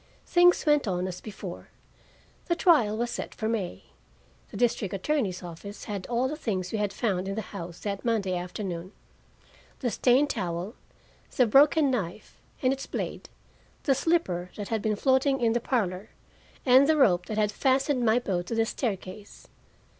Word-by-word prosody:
Things 355 0 +4
went 295 -5 +3
on 180 -1 -1
as 180 -1 -6
before. 195 -4 -8 0.8
The 345 - +2
trial 295 - +4
was 240 +1 -1
set - - -5
for 220 - -2
May. 215 -6 -3 0.7
The - - -8
district 225 -5 0
attorney's 195 -5 -1
office 180 +4 -9
had 200 -3 -5
all 245 +2 +1
the 300 - -3
things 190 - -3
we 220 - -2
had 205 -1 0
found 195 -6 -1
in 195 - -3
the 220 - -3
house 175 -3 -7
that 200 -2 -4
Monday 210 -6 0
afternoon 180 0 -5 0.9
the 245 -4 0
stained 265 +6 +3
towel, 175 +3 -3 0.6
the 250 - +6
broken 285 +4 +5
knife 205 -4 -4 0.2
and 255 +1 +4
its 270 - -6
blade, - - -5 0.5
the 275 - +3
slipper 250 - 0
that 205 -2 -6
had 225 -2 -1
been 215 -1 0
floating 270 +3 +2
in 230 -2 +2
the 240 - +1
parlor, 210 -5 -2 0.6
and 260 +2 +6
the 315 - +4
rope 180 -10 +3
that 215 - -4
had 210 -1 +2
fastened 265 +2 +1
my 225 0 +4
boat 185 -7 -2
to 230 - -3
the 225 0 +2
staircase. 205 -4 -5
220 Hz, 170 wpm, -27 LUFS, 190-260 Hz, 0.9 s, the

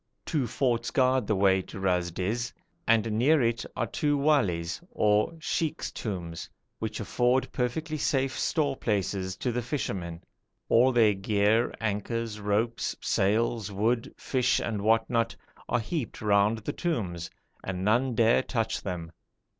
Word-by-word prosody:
Two 145 -7 0
forts 120 -1 0
guard 130 -3 +2
the 105 - +2
way 95 -1 +4
to 95 - -9
Ras 90 -2 +1
Dis, 105 +8 -2 0.4
and 115 0 +3
near 135 +9 +4
it 115 -2 +1
are 125 - 0
two 145 +4 0
wali's 100 - +1
or 105 +5 +2
sheikh's 160 -1 -2
tombs 85 -6 -5 0.3
which 110 -1 -3
afford 125 +4 +1
perfectly 155 +6 -2
safe 135 -1 +1
store 145 -4 0
places 95 -4 -1
to 125 - -1
the 125 +1 -1
fishermen. 95 - -4 0.5
All 125 +3 +5
their 115 -4 +5
gear, 105 +4 +2
anchors, 110 +1 -2
ropes, 105 +3 0
sails, 110 +1 +1
wood, 115 +4 0
fish, 130 -1 +1
and 110 -3 -2
what 110 +1 +3
not 115 -1 0 0.3
are 125 - +2
heaped 120 +3 -4
round 105 +1 +3
the 110 - -4
tombs, 95 - -2 0.3
and 95 0 -3
none 120 +4 +2
dare 115 +2 +4
touch 115 -4 -2
them. 85 -3 -5
115 Hz, 145 wpm, -28 LUFS, 100-125 Hz, 0.5 s, All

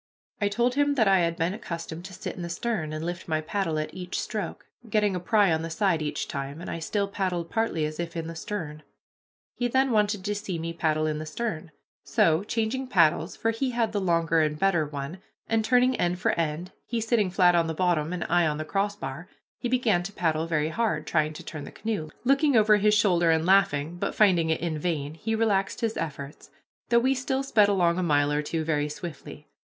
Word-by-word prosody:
I 205 - +3
told 235 +4 +1
him 285 +1 +2
that 220 -6 +3
I 195 -1 +5
had 170 -1 +1
been 165 +3 0
accustomed 170 -5 -6
to 190 - -9
sit - - -6
in - - -7
the 170 - -4
stern, 185 -4 -2
and 155 +1 -4
lift 175 +2 -5
my 155 -2 0
paddle 165 0 -2
at 155 0 -3
each 180 -1 -4
stroke, 215 -2 -4 0.2
getting 210 -2 +2
a - - -1
pry 200 +1 +3
on 160 0 +1
the 165 - -4
side 170 -1 +1
each 150 -1 -3
time, 140 +2 -5
and 175 - -6
I 165 - -4
still 200 +5 -1
paddled 185 -4 -2
partly 225 -9 0
as 155 +1 -5
if 170 0 -4
in 165 - -3
the 165 - -6
stern. 160 -3 -5 0.7
He 245 - -1
then 265 +2 +2
wanted 210 -3 +1
to 205 - 0
see 205 -4 -4
me 165 +1 -4
paddle 155 -2 0
in 155 -1 -1
the 155 - -5
stern. 170 -2 -4 0.3
So, 165 +3 +2
changing 230 +5 -2
paddles, 170 -5 +3
for 225 - 0
he 255 +4 -1
had 235 -3 0
the 205 -2 -1
longer 165 -2 +2
and 150 -1 0
better 170 -4 +2
one, 145 +5 -6 0.3
and 225 -1 +1
turning 250 +3 +3
end 175 +1 0
for - - +1
end, 165 +2 -2 0.2
he 235 - -1
sitting 220 -3 +1
flat 180 -1 +4
on 170 -1 +2
the 160 - -3
bottom 170 -3 +1
and 180 -1 -2
I 175 -1 +2
on 150 -1 -1
the 155 - -4
crossbar, 180 -4 -3 0.3
he 245 - -2
began 235 -8 +2
to 175 +3 -6
paddle 160 -4 0
very 155 -2 0
hard, 165 -5 -1
trying 155 -1 +1
to - - -9
turn 155 -2 -7
the - - -9
canoe, 205 -8 -3
looking 275 +2 +3
over 210 -1 +5
his 210 +1 +3
shoulder 180 -5 +3
and 160 0 +2
laughing, 175 -4 +3
but, - - -3
finding 180 -6 +4
it 160 - 0
in 165 -2 -2
vain, 150 -3 -2
he 225 +7 -2
relaxed 205 -1 +1
his 225 -1 0
efforts, 140 -3 -6 0.4
though 235 - +4
we 260 +3 +3
still 265 +1 -1
sped 215 -6 +4
along 180 -3 +2
a - - +1
mile 145 -4 +2
or 150 0 +1
two 160 +2 -2
very 150 -2 0
swiftly. 150 -1 -8
175 Hz, 225 wpm, -26 LUFS, 160-210 Hz, 0.7 s, I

